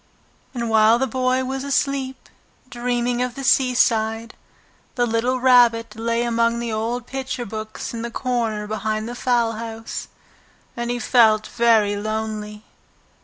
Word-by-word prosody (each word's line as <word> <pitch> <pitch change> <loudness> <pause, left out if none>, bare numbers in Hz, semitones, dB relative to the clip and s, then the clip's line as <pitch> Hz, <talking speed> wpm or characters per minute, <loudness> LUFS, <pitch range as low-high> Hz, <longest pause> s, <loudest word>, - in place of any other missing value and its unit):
And 235 -1 -2
while 220 +1 +5
the 265 - +1
Boy 255 +1 0
was 265 +1 -3
asleep, 275 -2 -1 0.4
dreaming 245 0 -1
of 250 -1 -2
the 275 - -6
seaside, 230 -4 +2 0.6
the 245 - +2
little 240 +3 0
Rabbit 235 -3 +4
lay 230 +1 -1
among 235 0 +1
the 235 -1 -3
old 230 +3 -2
picture 260 -2 -4
books 215 +2 -6
in 230 - -4
the 235 - -4
corner 230 -4 -2
behind 215 +1 -3
the 240 - -5
fowl 240 -2 +1
house, 225 0 -6 0.7
and 235 0 -3
he 245 - -1
felt 220 -3 +4
very 220 -3 +2
lonely. 215 0 -4
235 Hz, 140 wpm, -22 LUFS, 220-250 Hz, 0.7 s, while